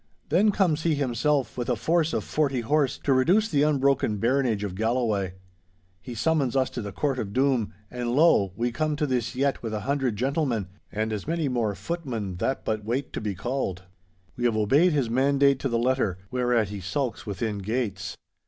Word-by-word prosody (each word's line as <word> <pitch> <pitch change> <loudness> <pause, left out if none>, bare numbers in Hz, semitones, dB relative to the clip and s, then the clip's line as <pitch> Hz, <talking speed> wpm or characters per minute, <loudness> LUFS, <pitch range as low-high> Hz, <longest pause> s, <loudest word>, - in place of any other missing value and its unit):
'Then 185 +8 +4
comes 180 -6 +2
he 160 -2 +2
himself, 135 -1 0
with 120 0 -3
a 125 - +2
force 165 +5 +1
of - - -1
forty 140 -5 0
horse, 140 +2 +1
to 140 - +1
reduce 180 +12 +3
the 145 -8 +1
unbroken 140 -7 +2
baronage 115 -1 +1
of 100 -3 -3
Galloway. 110 -3 0 0.7
He 120 +5 -8
summons 135 +1 +1
us 130 -1 +2
to 120 - -4
the 100 -1 -5
court 135 +5 -1
of 100 -3 -4
doom, 130 -4 +2 0.2
and 120 -1 -2
lo! 140 - +4
we 120 +3 -1
come 155 +4 -1
to 150 - 0
this 125 -2 -1
yett 140 +1 0
with 110 -2 -3
a 105 - -3
hundred 135 -3 0
gentlemen, 130 - -1 0.2
and 110 +1 -2
as 105 +3 -5
many 165 -2 0
more 115 -6 0
footmen 110 - -4
that 130 +8 -2
but 110 -1 -1
wait 125 +5 -2
to - - -3
be 105 -2 -3
called. 110 -5 -3 0.5
We 120 - -2
have 115 -2 +2
obeyed 140 - +4
his 140 -5 +1
mandate 140 +3 +3
to 135 - -1
the 120 - +1
letter, 120 -6 +1
whereat 120 -4 +1
he 105 -1 -5
sulks 115 +7 -3
within 105 +1 -2
gates. 100 -2 -3
125 Hz, 195 wpm, -26 LUFS, 110-140 Hz, 0.7 s, Then